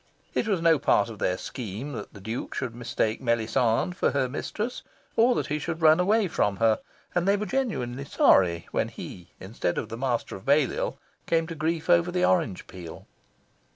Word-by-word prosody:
It - - 0
was 190 -6 0
no 165 -3 +5
part 110 -5 +3
of 110 -3 -9
their 90 - 0
scheme 120 +4 -6
that 115 -6 -7
the 105 - -12
Duke 110 +5 -5
should 125 -3 -3
mistake 115 -2 -1
Melisande 115 +4 +1
for 180 - +1
her 135 -2 +1
mistress, 210 - -4 0.3
or 240 +2 +4
that - - 0
he 150 +1 -2
should 160 +2 -4
run 155 +1 +7
away 205 +3 +3
from 105 - 0
her, 110 +1 +3 0.3
and 175 +1 +1
they 200 +1 +4
were 210 - -2
genuinely 140 - -2
sorry 85 -10 +3
when - - 0
he, 90 -2 -9
instead 95 -2 -3
of - - -3
the 115 - -5
Master 125 -2 -1
of 95 - -10
Balliol, 140 0 +1 0.3
came 165 -1 +2
to 165 - -6
grief 160 +1 -2
over 175 0 +4
the 180 0 +2
orange 160 - +1
peel. 85 -3 -10
140 Hz, 190 wpm, -27 LUFS, 110-175 Hz, 0.3 s, run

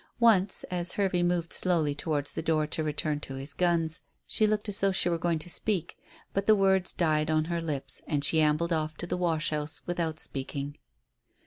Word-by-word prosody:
Once, 205 -5 +4
as 175 0 -1
Hervey 190 -3 +1
moved 175 -1 0
slowly 165 -5 +1
towards 145 -1 -1
the - - -3
door 155 -1 +1
to 155 +1 -2
return 150 0 -1
to 135 -2 -7
his 135 +2 -6
guns, 170 -1 +1 0.2
she 215 - +3
looked 210 0 0
as 205 -1 +1
though 195 0 +3
she 185 -2 +1
were 170 -1 0
going 170 -1 +1
to 155 - -5
speak. 185 0 -1 0.4
But 195 0 -1
the 215 - +7
words 190 -2 +3
died 155 -2 +1
on 155 0 +2
her 170 0 -2
lips, 140 -5 -3
and 145 -2 0
she 160 +2 +3
ambled 155 +3 +2
off 155 -1 -2
to - - -4
the - - -2
wash 165 -4 0
house 150 0 -3
without 165 -3 -2
speaking. 140 +1 -3
165 Hz, 205 wpm, -29 LUFS, 155-180 Hz, 0.4 s, the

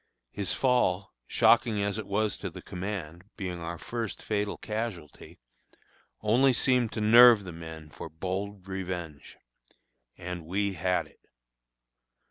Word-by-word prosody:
His 100 -1 -3
fall, 100 -7 +1
shocking 115 -3 +3
as 100 +1 -1
it 105 - -6
was 105 +1 0
to - - -4
the - - -11
command, 90 -2 -6
being 90 -4 -4
our 85 +1 -5
first 115 +3 -5
fatal 105 -1 -1
casualty, 105 -8 -6 0.8
only 125 +5 +4
seemed 125 -2 +2
to 110 - -3
nerve 115 0 +8
the 90 - -7
men 80 -2 -9
for 80 - -8
bold 95 +4 -5
revenge. 90 -6 -6 0.8
And 90 -1 -6
we 100 +2 0
had 90 +1 0
it. - - -22
100 Hz, 130 wpm, -28 LUFS, 90-110 Hz, 0.8 s, nerve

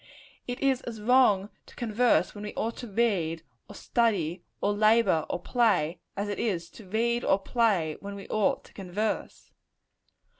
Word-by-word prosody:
It 245 0 -4
is 270 -2 +2
as 230 -2 -7
wrong 210 -4 +4 0.2
to - - -16
converse 240 +1 +2
when 205 - -8
we 210 - -6
ought 230 +1 -2
to 245 - -7
read, 190 -7 0 0.3
or - - -10
study, 190 -8 0 0.2
or 205 - +1
labor, 215 -5 +3
or - - -2
play, 180 -7 +1 0.2
as 200 +1 -1
it 205 - -3
is 175 -7 -2
to 205 -5 -14
read 235 +3 +1
or 195 - +3
play 195 -7 +1
when 200 0 -7
we 200 - -9
ought 215 -2 +1
to - - -18
converse. 200 +3 -4
210 Hz, 165 wpm, -28 LUFS, 190-235 Hz, 0.3 s, wrong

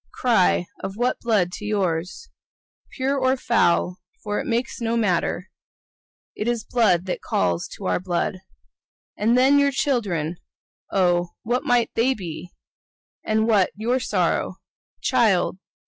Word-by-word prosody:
Cry 225 -7 +3 0.2
of 195 +1 -5
what 245 +2 0
blood 210 -7 +1
to 210 - -8
yours?— 190 - -2 0.7
Pure 275 0 0
or 260 0 +2
foul, 180 -7 +1 0.2
for 210 -1 -2
it - - -4
makes 235 +1 -2
no 230 0 0
matter, 185 -2 0 0.8
It's 235 0 -2
blood 200 -8 +2
that 185 - -3
calls 85 -2 0
to 195 - -8
our - - +1
blood. 180 0 -2 0.8
And 225 +4 +2
then 270 +3 +5
your 280 0 +4
children—oh, 180 - -1 0.2
what 240 +3 -1
might 245 -2 +2
they 255 +4 +2
be? 180 -3 -7 0.7
And 220 0 +1
what 205 -5 +4
your 235 +5 0
sorrow? - - 0 0.5
Child! 215 -8 +2
215 Hz, 130 wpm, -23 LUFS, 180-245 Hz, 0.8 s, then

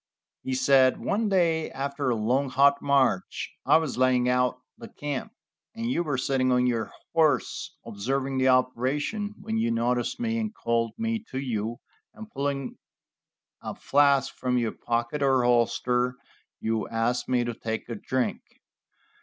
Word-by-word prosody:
He 130 - -2
said: 130 0 +4
"One 210 +1 0
day, 165 -4 +2
after 140 0 -3
a 120 - +2
long, 125 +6 +1
hot 140 +2 +4
march, 135 -9 +1 0.2
I - - +7
was 155 -6 -2
laying 130 -1 +3
out 125 0 +2 0.2
the - - -10
camp, 145 +7 -5 0.4
and 230 +2 -2
you 170 - +1
were 150 -5 -1
sitting 130 0 +1
on 125 0 +3
your 115 -3 -1 0.2
horse 155 -6 +1
observing 130 +5 -2
the 130 - +3
operation, 135 - 0
when 110 0 -2
you 115 +1 +1
noticed 120 - 0
me 230 -1 -1
and 220 -1 -3
called 115 -1 0
me 225 -1 -2
to 130 - -5
you, 115 -3 -3 0.3
and 220 0 -10
pulling 140 -1 -3 0.8
a - - -6
flask 140 -1 +3
from 125 -1 -1
your 115 -3 0
pocket 120 +5 -2
or 135 -2 +3
holster, 125 +1 +2 0.4
you 110 -2 -1
asked 115 +2 -1
me 125 -1 +2
to 120 0 -3
take 110 0 -4
a 120 - -4
drink. 125 +4 -2
130 Hz, 155 wpm, -26 LUFS, 120-140 Hz, 0.8 s, I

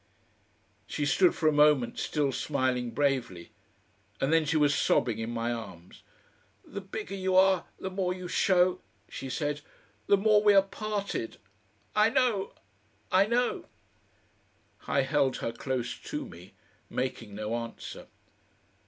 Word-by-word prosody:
She 145 - -2
stood 180 +5 +4
for 160 - +1
a - - +6
moment 150 -5 +3
still 145 -3 0
smiling 130 -3 -1
bravely, 120 -9 -1 0.7
and 135 +4 +1
then 165 -1 +4
she 155 +2 +1
was 145 -1 +4
sobbing 120 -4 +1
in 110 +1 -3
my 120 0 -2
arms. 95 -7 -9 0.6
"The 200 - -7
bigger 195 +1 -6
you 190 -1 -1
are 190 -1 +5
the 190 - -4
more 185 -1 -1
you 180 0 -5
show," 180 0 +2 0.3
she 135 - -7
said 145 +2 -2 0.5
"the 200 - +5
more 210 +1 +4
we 205 -1 +5
are 195 - +7
parted. 200 - -4 0.6
I 210 +1 +5
know, 245 -6 +1 0.6
I 195 +2 +5
know 245 +2 0 0.6
" - - -39
I 140 - +2
held 135 0 +1
her 115 - -3
close 125 +1 -3
to - - -6
me, 90 +3 -13 0.3
making 115 -5 -4
no 110 +1 -3
answer. 115 -1 -7
150 Hz, 145 wpm, -29 LUFS, 125-190 Hz, 0.7 s, are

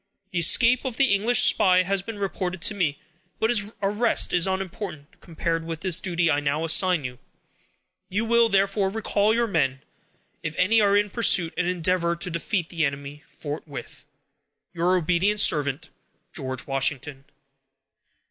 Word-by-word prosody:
The 175 - -1
escape 235 +9 +4
of 255 -4 -5
the 265 -6 +3
English 220 +5 +4
spy 185 -1 +4
has 195 +1 -1
been 220 +2 -8
reported 190 -2 -4
to 215 - +3
me, 165 -8 -1 0.4
but 220 +1 +1
his 210 -3 0
arrest 210 +4 +2
is 175 +1 +2
unimportant, 190 -5 -6
compared 165 0 -3
with 165 0 -6
the 185 - -3
duty 170 -1 +1
I 145 - +1
now 145 +2 -2
assign 175 -1 +3
you. 125 -1 -7 0.9
You 210 +4 -1
will, 235 0 +3
therefore, 195 0 +1
recall 210 0 0
your 235 +1 +1
men, 135 - -1 0.6
if 160 -1 -5
any 215 +5 +3
are 200 -1 +3
in 205 -1 0
pursuit, 180 -7 +2
and 180 0 -1
endeavor 180 -1 0
to 175 +1 -4
defeat 170 +1 -3
the 165 -2 -2
enemy 140 +1 -4
forthwith." 145 -3 -9 0.7
Your 175 +2 +1
obedient 180 +5 0
servant, 150 -4 +1 0.4
GEO. 130 -2 -5
WASHINGTON. 135 0 -3
180 Hz, 155 wpm, -24 LUFS, 155-205 Hz, 0.9 s, escape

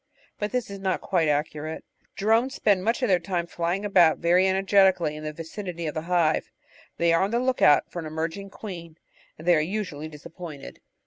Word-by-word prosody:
But 210 0 -2
this 250 -5 -2
is 200 - -7
not 190 -2 -1
quite 170 -4 0
accurate. 150 +1 -2 0.3
Drones 225 +6 +2
spend 195 -3 +2
much 230 +5 0
of - - +3
their 185 -3 +3
time 175 0 -2
flying 175 +4 -2
about 175 -6 +5
very 180 +3 +3
energetically 190 -4 +3
in 155 - -8
the 155 - -3
vicinity 170 +2 -6
of 150 - -3
the 155 - -3
hive. 170 -3 +2 0.5
They 170 0 +3
are 165 - +3
on 195 - +1
the 235 - 0
look 255 +1 0
out 145 - +5
for 175 - -5
an 160 - -5
emerging 165 +5 -4
queen, 170 -6 -9 0.4
and 160 - -11
they 175 - +6
are - - +3
usually 155 -3 -3
disappointed. 155 0 -10
175 Hz, 200 wpm, -25 LUFS, 160-195 Hz, 0.5 s, they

